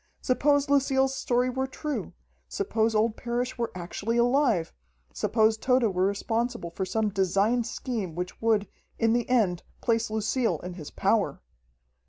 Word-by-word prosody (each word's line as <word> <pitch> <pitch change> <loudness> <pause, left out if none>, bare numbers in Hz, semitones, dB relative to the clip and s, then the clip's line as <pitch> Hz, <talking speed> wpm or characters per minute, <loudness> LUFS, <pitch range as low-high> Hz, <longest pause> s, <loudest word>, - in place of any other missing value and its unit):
Suppose 285 +2 +2
Lucille's 270 -1 +2
story 250 -1 +1
were 265 +1 -1
true! 295 +2 -4 0.3
Suppose 225 - 0
old 215 +1 +2
Parrish 245 +1 -3
were 235 - -1
actually 200 +6 -3
alive, 240 - +2 0.4
suppose 220 -1 +2
Tode 255 -1 +2
were 185 +1 +2
responsible 225 -2 -2
for 190 +3 -3
some 215 +3 0
designed 200 +5 +1
scheme 220 - -4
which 180 +1 -5
would, 220 -3 +2 0.3
in 225 -1 +2
the 240 0 0
end 205 -9 +2 0.2
place 230 -1 +1
Lucille 220 +3 0
in 180 0 -5
his 160 -5 -8
power! - - +1
230 Hz, 145 wpm, -27 LUFS, 200-250 Hz, 0.4 s, Suppose